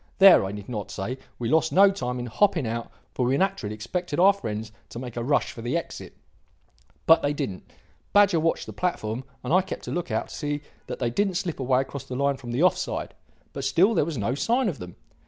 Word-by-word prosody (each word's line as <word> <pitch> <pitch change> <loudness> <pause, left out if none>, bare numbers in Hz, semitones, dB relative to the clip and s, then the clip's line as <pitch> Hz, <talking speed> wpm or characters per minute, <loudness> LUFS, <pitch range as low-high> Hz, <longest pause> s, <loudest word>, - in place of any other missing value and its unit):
There, 195 - +8
I 95 - -4
need 100 -1 -8
not 105 -5 -5
say, 120 +8 -4 0.2
we 120 - -3
lost 160 +5 +2
no 195 +2 +6
time 125 -10 -3
in 120 - -4
hopping 165 - +2
out, 115 +1 -3 0.2
for 125 - -1
we 130 +3 +2
naturally 190 - -1
expected 145 - -3
our 195 +3 +7
friends 110 - -5 0.2
to - - -9
make 125 -1 -7
a 120 - -2
rush 140 +4 +1
for 115 - -9
the 120 +8 -1
exit. 170 - -7 0.9
But 165 0 +6
they 145 +1 0
didn't. 135 -11 -5 0.4
Badger 200 -4 +5
watched 165 +1 0
the - - -8
platform, 125 -9 -2 0.2
and 130 +5 -1
I 185 - +6
kept 190 - -7
a - - -3
look 175 0 -3
out - - -2
to - - -8
see 145 -1 -3 0.3
that - - -5
they 120 -2 -1
didn't 195 - 0
slip 175 -4 -2
away 130 0 +2
across 135 0 -7
the 125 - -6
line 140 +1 +1
from 125 -2 -10
the 130 +8 +1
off 185 - +4
side. - - -4 0.4
But 140 - -5
still 175 +10 +4
there - - +3
was 160 -3 -4
no 110 +3 0
sign 235 - +1
of 165 - -6
them. 90 -1 -9
140 Hz, 235 wpm, -25 LUFS, 120-175 Hz, 0.9 s, There